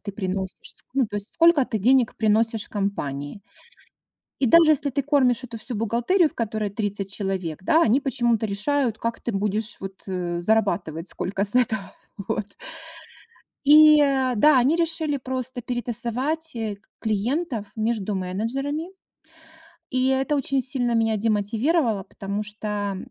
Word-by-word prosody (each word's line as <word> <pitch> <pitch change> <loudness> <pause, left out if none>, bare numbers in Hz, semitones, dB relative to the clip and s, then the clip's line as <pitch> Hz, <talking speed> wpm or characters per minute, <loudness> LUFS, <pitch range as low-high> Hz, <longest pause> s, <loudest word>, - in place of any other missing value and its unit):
ты 200 - -7
приносишь, 190 -1 -4 0.2
ну, 270 -2 +3
то 205 - -6
есть 205 +10 +3
сколько 335 -5 +5
ты 220 - -3
денег 250 +3 +3
приносишь 220 +1 +1
компании. 170 -5 -4 1.0
И 265 - +1
даже 325 +4 +6
если 295 -1 +3
ты 280 +2 -1
кормишь 260 -3 +2
эту 230 -2 -8
всю 230 +2 -4
бухгалтерию, 240 - +1
в - - -21
которой 215 -2 -3
30 200 -1 -3
человек, 185 -5 -4
да, 320 - +3
они 235 +5 +3
почему-то 240 -5 0
решают, 230 +3 0
как 230 0 -3
ты - - -3
будешь, 210 +2 -1
вот, 195 0 -8
зарабатывать 175 -2 -1
сколько 195 +1 -2
с 205 +3 +3
этого. 220 -5 0 0.4
Вот. 210 -2 -2 1.2
И 305 +1 +8
э, 265 -3 +1
да, 295 +5 +5
они 270 +7 +3
решили 320 -3 +1
просто 255 -1 -4
перетасовать, 245 +6 -3
э, 220 -3 -4 0.2
клиентов 225 - -2
между 220 -2 -1
менеджерами. 255 - -3 1.0
И 255 0 +1
это 265 +3 +1
очень 270 -1 0
сильно 250 -3 0
меня 225 -1 +1
демотивировало, 220 - 0
потому 200 +1 -5
что, 210 -1 -4
230 Hz, 140 wpm, -23 LUFS, 205-270 Hz, 1.2 s, И